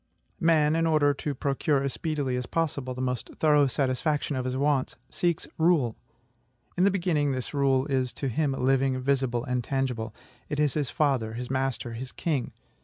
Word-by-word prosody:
Man, 160 -3 +3
in 165 0 +2
order 150 -2 +4
to 140 +1 -4
procure 140 +1 0
as 140 - -2
speedily 145 -5 -2
as 125 -1 -3
possible 140 -6 -2
the 130 - -3
most 125 -2 -2
thorough 150 -2 +4
satisfaction 140 +3 0
of 130 -1 -2
his 130 0 -2
wants, 140 -1 +1
seeks 170 -2 0
RULE. 160 -9 +3 0.8
In 180 - +3
the - - +6
beginning, 170 -7 +1
this 130 +2 -4
rule 135 -2 +2
is 130 -3 0
to 140 - -3
him 140 +3 0
living, 135 0 +1
visible, 130 -2 0
and 125 -2 -1
tangible. 125 -4 -2 0.4
It 150 -1 -2
is 150 -3 +2
his 145 -5 -1
father, 130 -7 +1
his 125 +2 -5
master, 130 -3 -1
his 125 +3 -6
king. 145 -7 -2
135 Hz, 180 wpm, -27 LUFS, 130-150 Hz, 0.8 s, the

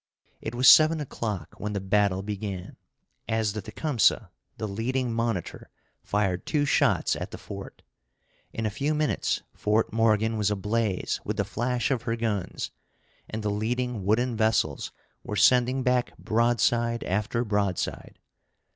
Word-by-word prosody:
It 110 - -5
was 125 +1 +3
seven 155 +1 +8
o'clock 110 - -4
when 105 0 -3
the 100 - -1
battle 95 0 +1
began, 100 -3 -5 0.5
as 110 -2 0
the 105 - -4
Tecumseh, 115 - +1 0.3
the 110 - -3
leading 120 +4 -1
monitor, 115 -6 -3 0.3
fired 100 -3 0
two 145 -2 +1
shots 140 - +2
at - - -5
the - - -8
fort. - - -9 0.7
In 110 - -3
a 110 - 0
few 145 +7 -1
minutes 150 0 0
Fort 105 +1 0
Morgan 110 0 +2
was 105 -1 +1
ablaze 105 0 -1
with - - -3
the - - +1
flash 120 +3 -1
of 130 -4 +1
her 115 -1 -1
guns, 110 -5 -3 0.6
and 110 0 -4
the 105 - 0
leading 120 +1 -2
wooden 115 +5 +1
vessels 110 -10 +1 0.3
were 105 - -4
sending 125 +5 +4
back 125 -1 +1
broadside 115 +1 +1
after 105 +5 -1
broadside. 100 -4 -2
110 Hz, 145 wpm, -27 LUFS, 105-120 Hz, 0.7 s, seven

